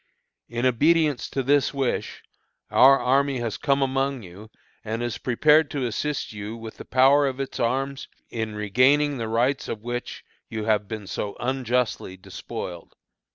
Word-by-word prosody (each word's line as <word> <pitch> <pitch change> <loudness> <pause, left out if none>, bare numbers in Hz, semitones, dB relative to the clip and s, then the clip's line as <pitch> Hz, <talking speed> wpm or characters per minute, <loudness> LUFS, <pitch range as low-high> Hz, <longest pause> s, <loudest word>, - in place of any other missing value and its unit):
"In 120 +1 -2
obedience 150 +3 +2
to 135 - -2
this 140 +1 +2
wish, 135 -3 -2 0.5
our 135 +1 +7
army 135 +1 +2
has 115 -3 -3
come 140 -1 +1
among 135 -1 -1
you, 95 +4 -12 0.3
and 115 +2 -3
is 120 -2 -3
prepared 150 +5 +3
to 140 -3 -2
assist 135 +3 -3
you 105 +2 -6
with 115 -1 -9
the - - -9
power 135 +3 +4
of 130 0 -4
its 135 - -4
arms 135 +3 -1 0.2
in 110 -2 -3
regaining 130 +7 +3
the 115 - -2
rights 125 +5 +1
of 110 -1 -5
which 120 +1 -5 0.3
you 110 -1 -4
have 105 -2 +1
been 110 -1 -6
so 100 +1 -4
unjustly 125 -6 -1
despoiled." 90 -2 -8
125 Hz, 155 wpm, -24 LUFS, 110-140 Hz, 0.5 s, our